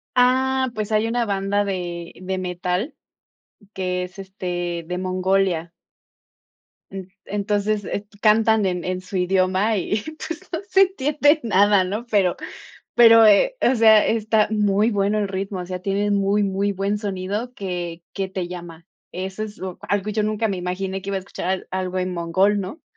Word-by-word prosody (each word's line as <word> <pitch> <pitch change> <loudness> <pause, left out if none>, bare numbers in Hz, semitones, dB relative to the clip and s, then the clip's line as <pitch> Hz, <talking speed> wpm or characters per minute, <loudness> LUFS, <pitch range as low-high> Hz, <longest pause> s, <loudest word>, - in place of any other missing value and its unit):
Ah, 260 +1 +3
pues 215 0 -3
hay 215 +1 +2
una 235 +1 0
banda 200 0 0
de 175 -3 -4
de 190 +1 -4
metal 180 - -2 0.8
que 180 -1 -2
es, 180 +2 -9
este, 175 -3 -4
de 180 +1 -3
Mongolia. 185 -2 0 1.2
N 195 0 -6 0.2
entonces, 205 0 -1
est 200 - -9 0.2
cantan 220 +1 +5
en 180 - -3
en 185 - -3
su 195 - -7
idioma 185 +1 +2
y, 205 +3 -1 0.3
pues, 330 0 -5
no 335 - -2
se 385 - +6
entiende 295 -3 +2
nada, 205 -2 +4
¿no? 210 +6 -4
Pero 190 -4 +3 0.6
pero, 230 -1 +9
eh, 215 - +5
o 255 - +3
sea, 220 -2 +6
está 220 -1 +2
muy 210 0 +2
bueno 205 +1 +1
el 205 - 0
ritmo, 195 0 -4
o 180 - -5
sea, 180 0 -5
tienen 200 +2 0
muy, 200 +1 +2
muy 200 +1 0
buen 200 +2 -1
sonido 205 +4 -4
que 175 -5 -5
que 195 -1 -3
te 185 -2 -4
llama. 170 -2 -9 0.3
Eso 190 +3 -4
es 210 -1 -8
o 185 -1 -5
algo 205 0 -1
yo 210 0 0
nunca 215 +1 0
me 195 -3 -2
imaginé 190 +2 -3
que 195 - -6
iba 195 - -1
a - - -2
escuchar, 190 -1 -4
algo 185 0 -2
en 185 0 -2
mongol, 185 +4 +1
¿no? 195 - -6
195 Hz, 170 wpm, -22 LUFS, 185-215 Hz, 1.2 s, pero